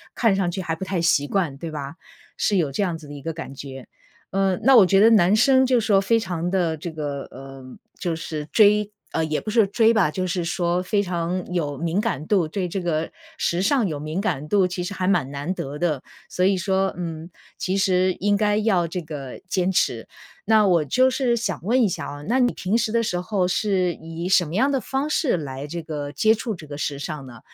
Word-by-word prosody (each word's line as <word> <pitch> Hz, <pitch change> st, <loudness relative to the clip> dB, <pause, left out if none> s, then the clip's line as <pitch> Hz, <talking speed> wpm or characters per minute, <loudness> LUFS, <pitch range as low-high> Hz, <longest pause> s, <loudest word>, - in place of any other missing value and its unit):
看 225 Hz, -4 st, +3 dB
上 190 Hz, -2 st, 0 dB
去 190 Hz, +2 st, -4 dB
还 165 Hz, -3 st, -2 dB
不 190 Hz, -, -5 dB
太 185 Hz, -2 st, -1 dB
习 165 Hz, -4 st, +2 dB
惯， 170 Hz, -8 st, -1 dB
对 165 Hz, +3 st, -6 dB
吧。 145 Hz, 0 st, -6 dB, 0.4 s
是 205 Hz, -, +1 dB
有 160 Hz, -5 st, +1 dB
这 140 Hz, -, -1 dB
样 175 Hz, -4 st, -1 dB
子 155 Hz, -2 st, -13 dB
的 145 Hz, -, -9 dB
一 145 Hz, -, -9 dB
个 165 Hz, +3 st, -3 dB
感 160 Hz, -4 st, -7 dB
觉。 135 Hz, -1 st, -9 dB, 0.4 s
呃， 195 Hz, -1 st, +1 dB
那 270 Hz, +3 st, +6 dB
我 215 Hz, -5 st, +8 dB
觉 195 Hz, +1 st, +3 dB
得 220 Hz, +3 st, +7 dB
男 195 Hz, -3 st, +5 dB
生 260 Hz, +4 st, +5 dB
就 255 Hz, -1 st, +3 dB
是 220 Hz, -, -3 dB
说 195 Hz, -2 st, +4 dB
非 230 Hz, +4 st, +2 dB
常 175 Hz, -4 st, -3 dB
地 175 Hz, -4 st, +1 dB
这 165 Hz, +2 st, -6 dB
个 145 Hz, -3 st, -4 dB
呃， 135 Hz, 0 st, -11 dB, 0.3 s
就 175 Hz, -3 st, -2 dB
是 155 Hz, -2 st, -5 dB
追 210 Hz, -1 st, +4 dB, 0.2 s
呃， 160 Hz, -, +1 dB
也 155 Hz, -1 st, -1 dB
不 215 Hz, -, -6 dB
是 220 Hz, -1 st, +4 dB
追 225 Hz, +3 st, +3 dB
吧， 195 Hz, -9 st, +2 dB
就 185 Hz, +3 st, -2 dB
是 175 Hz, 0 st, -1 dB
说 175 Hz, +1 st, 0 dB
非 200 Hz, +2 st, +1 dB
常 180 Hz, -1 st, -2 dB
有 145 Hz, -5 st, -2 dB
敏 170 Hz, +5 st, 0 dB
感 150 Hz, -5 st, -3 dB
度 195 Hz, -5 st, +3 dB
对 185 Hz, +2 st, -2 dB
这 185 Hz, +2 st, -3 dB
个 165 Hz, -2 st, -1 dB, 0.3 s
时 175 Hz, +1 st, 0 dB
尚 230 Hz, +1 st, +2 dB
有 155 Hz, -, -3 dB
敏 155 Hz, +4 st, -3 dB
感 150 Hz, -8 st, -2 dB
度， 200 Hz, -3 st, +3 dB
其 180 Hz, 0 st, -4 dB
实 190 Hz, +3 st, -4 dB
还 185 Hz, -1 st, -2 dB
蛮 165 Hz, -8 st, +1 dB
难 145 Hz, +6 st, -3 dB
得 145 Hz, -5 st, -5 dB
的。 155 Hz, -6 st, -1 dB, 0.3 s
所 180 Hz, -, -1 dB
以 190 Hz, +1 st, +3 dB
说， 190 Hz, +1 st, 0 dB
嗯， 165 Hz, -2 st, -5 dB, 0.3 s
其 185 Hz, +1 st, -1 dB
实 185 Hz, -1 st, +2 dB
应 205 Hz, +1 st, +2 dB
该 210 Hz, 0 st, +2 dB
要 205 Hz, -5 st, +2 dB
这 170 Hz, +2 st, -4 dB
个 145 Hz, -5 st, -8 dB
坚 185 Hz, 0 st, 0 dB
持。 120 Hz, -10 st, 0 dB, 0.4 s
那 215 Hz, -2 st, +5 dB
我 170 Hz, -4 st, +3 dB
就 255 Hz, -, +3 dB
是 250 Hz, -2 st, +1 dB
想 205 Hz, -4 st, -2 dB
问 245 Hz, +7 st, +2 dB
一 220 Hz, -, +4 dB
下 180 Hz, -, -4 dB
哦， 145 Hz, 0 st, -8 dB
那 250 Hz, +5 st, +2 dB
你 245 Hz, -1 st, +3 dB
平 195 Hz, +4 st, -1 dB
时 230 Hz, -2 st, 0 dB
的 230 Hz, +1 st, +2 dB
时 180 Hz, -6 st, -1 dB
候 185 Hz, -1 st, 0 dB
是 185 Hz, -2 st, +1 dB
以 165 Hz, +2 st, -6 dB
什 185 Hz, -1 st, +4 dB
么 160 Hz, +3 st, -6 dB
样 260 Hz, +7 st, +3 dB
的 270 Hz, -2 st, 0 dB
方 270 Hz, +5 st, -2 dB
式 275 Hz, -, +1 dB
来 140 Hz, -2 st, -6 dB
这 170 Hz, +3 st, -5 dB
个 150 Hz, -3 st, -5 dB
接 220 Hz, +10 st, +3 dB
触 225 Hz, 0 st, -4 dB
这 165 Hz, -5 st, -10 dB
个 145 Hz, -1 st, -7 dB
时 145 Hz, -1 st, -3 dB
尚 150 Hz, -2 st, -5 dB
呢？ 120 Hz, -3 st, -12 dB
180 Hz, 255 characters per minute, -23 LUFS, 160-205 Hz, 0.4 s, 我